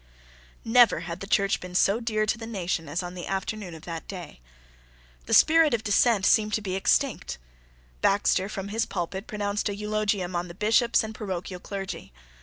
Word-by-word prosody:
Never 240 +1 +5
had 170 +1 -6
the 195 - -7
Church 200 -1 +2
been 180 0 -9
so 200 +4 +3
dear 215 -2 0
to 215 - +1
the 225 - -7
nation 175 -7 -3
as 170 +5 -2
on 175 0 -6
the 180 -1 -7
afternoon 195 -2 -4
of 160 - -12
that 165 -2 -6
day. 180 - -8 0.9
The - - -1
spirit 320 -4 +6
of 220 - -5
dissent 210 -1 +3
seemed 215 -1 +3
to 215 - -2
be 190 -2 -3
extinct. 190 - 0 0.6
Baxter 195 -1 +2
from 200 -1 -5
his 225 +2 -1
pulpit 190 +2 -4
pronounced 205 0 -2
an 200 - -4
eulogium 210 -3 -1
on 175 +1 -2
the 170 - -10
Bishops 230 +3 +3
and 220 0 -6
parochial 185 -4 -5
clergy. 195 +1 -6
200 Hz, 185 wpm, -26 LUFS, 180-215 Hz, 0.9 s, spirit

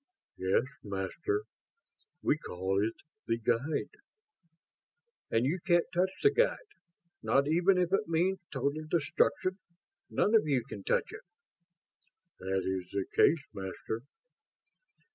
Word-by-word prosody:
"Yes, 95 +4 +2 0.2
Master. 100 - -2 0.8
We - - +3
call 95 0 -1
it 110 +1 -1 0.3
the 115 - +1
'Guide'." 130 - -1 1.3
"And 115 +2 +2
you 165 +7 0
can't 175 0 +3
touch 180 +2 +3
the 420 - +7
Guide. - - +3 0.6
Not 140 +1 +2
even 175 +5 +4
if 180 0 +1
it 205 +2 +2
means 180 +4 +1
total 145 +3 -2
destruction, 175 +3 +1 0.5
none 210 - +2
of 215 -8 +5
you 135 -5 +2
can 100 -7 -8
touch - - +1
it." 430 - -8 1.2
"That 95 0 -1
is 95 -1 -2
the 100 -1 -2
case, 160 -3 +5
Master." 95 +4 -5
145 Hz, 125 wpm, -31 LUFS, -, 1.3 s, the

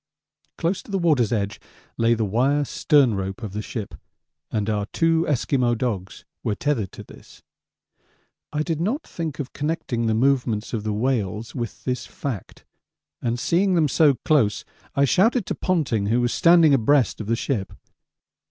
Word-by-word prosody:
Close 175 +3 -1
to - - -18
the 195 - 0
water's 150 - +2
edge 100 -3 -1 0.4
lay 115 +1 +3
the 110 -1 0
wire 135 +8 +1
stern 140 -4 +3
rope 95 +3 -4
of 105 -3 -5
the 105 - -3
ship, 105 -5 -6 0.6
and 105 -2 -2
our 105 -2 -1
two 165 +4 +1
Esquimaux 125 -3 +1
dogs 105 -6 -4 0.2
were 105 - 0
tethered 120 -9 -1
to - - -10
this. - - -16 1.1
I 150 0 -1
did 160 -1 -2
not 240 - -1
think 165 -4 -5
of 135 -3 -6
connecting 145 -6 -2
the 110 - +2
movements 120 -3 +1
of 110 -3 -2
the 110 - -2
whales 110 -2 -1
with 120 -3 -5
this 125 -1 -3
fact, 125 -10 -6 0.6
and 120 0 -1
seeing 185 +7 +2
them 160 -3 +3
so 145 0 +4
close 135 -10 +2 0.3
I 140 - +4
shouted 220 - +3
to - - -2
Ponting, 145 - 0
who 115 +3 +2
was 120 0 +1
standing 165 -3 +5
abreast 135 -1 +2
of 105 - -7
the 115 - +2
ship. 115 -6 -2
125 Hz, 170 wpm, -23 LUFS, 110-155 Hz, 1.1 s, standing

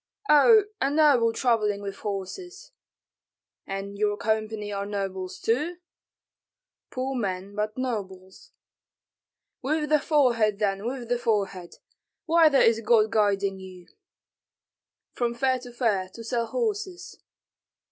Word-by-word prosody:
"Oh, 425 +9 +7 0.2
a 270 - +2
noble 285 -6 +4
travelling 225 -4 +1
with 200 -1 -6
horses." 355 - -6 1.0
"And 195 +1 -6
your 205 -1 +1
company 215 -1 -2
are 200 0 -3
nobles 190 -2 -4
too?" 300 +10 -1 1.1
"Poor 260 +1 -3
men, 195 -4 -3
but 210 +2 -3
nobles." 190 -7 -5 1.1
"With 300 +2 -1
the 305 0 +4
forehead, 240 -9 +2
then, 200 0 -1
with 250 -1 -5
the 245 0 0
forehead. 200 -6 -2 0.5
Whither 320 -4 +5
is 225 -3 +4
God 220 -1 +3
guiding 200 -3 +1
you?" 185 -2 -12 1.2
"From 235 -1 -1
fair 260 +1 +1
to 245 0 -11
fair, 215 -6 0
to 230 - -8
sell 235 0 -2
horses." 415 - -4
225 Hz, 115 wpm, -26 LUFS, 200-270 Hz, 1.2 s, Oh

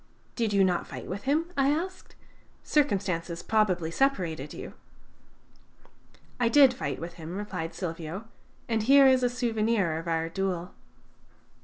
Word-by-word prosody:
"Did 225 -3 0
you 200 -1 +4
not 180 -2 +1
fight - - -8
with 195 +3 -6
him?" 315 +5 +1
I 275 0 +3
asked. 350 +6 -3 0.5
"Circumstances 185 - 0
probably 185 -7 +1
separated 170 - 0
you." - - -8 1.7
"I 240 -1 +3
did 270 0 +6
fight 255 - -4
with 170 +1 -6
him," 165 +4 -6
replied 185 -6 -5
Silvio; 170 +3 -5 0.4
"and 225 -2 0
here 275 +5 +6
is 260 -1 +5
a 245 - +2
souvenir 225 -8 0
of 165 - -8
our 165 0 0
duel." 180 0 -3
200 Hz, 140 wpm, -28 LUFS, 170-255 Hz, 1.7 s, did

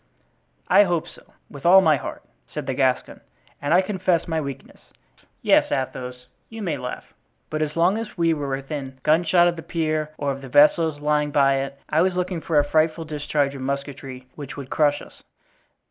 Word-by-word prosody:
"I 205 - +6
hope 175 -3 -1
so, - - -14 0.3
with 140 - -12
all 180 +3 +8
my 160 -5 +4
heart," 135 - -6 0.3
said - - -5
the 135 - -2
Gascon, 130 -1 0 0.4
"and 145 +1 -2
I 175 +2 +6
confess 185 -3 0
my 160 -1 -1
weakness. 140 -3 -8 0.6
Yes, - - +4
Athos, 125 -1 -4 0.2
you 225 -1 -7
may 165 -6 -1
laugh, 125 - -7 0.4
but 155 0 -2
as 150 -1 -2
long 180 +6 +3
as 225 -3 -7
we 165 -1 +3
were 145 -3 -3
within 135 0 -5
gunshot 170 +3 +4
of 175 -1 -1
the - - -6
pier 155 -2 -2
or 145 -1 -1
of 135 0 -6
the 135 - -9
vessels 150 +2 +4
lying 150 0 +1
by 135 -1 +3
it 135 +1 -4
I 155 +1 +2
was 185 0 +1
looking 180 -2 -2
for 160 -1 0
a 145 - +4
frightful 160 +2 +1
discharge 145 -2 -1
of 135 - -8
musketry 135 -1 -5
which 145 -2 -8
would 135 -2 -8
crush 145 -1 +2
us." - - -16
150 Hz, 190 wpm, -23 LUFS, 140-165 Hz, 0.6 s, all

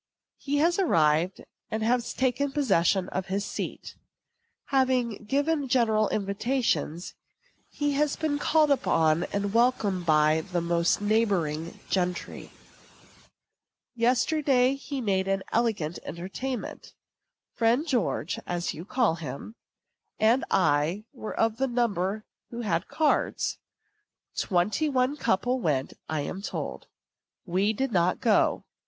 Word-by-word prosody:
He 285 0 -1
has 340 +5 +2
arrived, 165 - +2 0.3
and 230 +3 +1
taken 260 +2 +1
possession 195 - +2
of 185 0 -3
his 200 +2 -2
seat. - - -5 0.8
Having 255 -5 +1
given 285 +4 0
general 220 -4 +2
invitations, 200 - -1 0.6
he 290 -1 -1
has 290 0 +1
been 300 -2 -1
called 305 0 +3
upon 165 - +2
and 200 0 -3
welcomed 220 -7 +1
by 155 0 +4 0.2
most 170 0 +2
of - - -9
the - - -1
neighboring 175 -8 0
gentry. 180 -2 -2 1.4
Yesterday 255 +2 +2
he 275 0 -5
made 190 -4 0
an 195 0 0
elegant 210 -9 0
entertainment. 195 - -6 0.6
Friend 235 +5 +2
George 240 - -1
(as 175 0 -2
you 165 - -8
call 220 -7 +1
him) 150 +6 -7 0.6
and 230 +5 +3
I 160 +4 +2
were 225 -5 -6
of 225 0 +2
the 270 +1 +1
number 215 -4 -1 0.2
who 235 0 -6
had 170 -5 -1
cards. 310 -2 0 0.8
Twenty 205 - +1
one 260 +1 +1
couple 245 0 0
went, 140 -7 0 0.2
I 155 -2 -1
am 190 +6 -5
told. - - -5 0.6
We 190 +3 +1
did 265 +4 -2
not 180 -2 +2
go. 220 -3 +2
215 Hz, 120 wpm, -27 LUFS, 180-260 Hz, 1.4 s, by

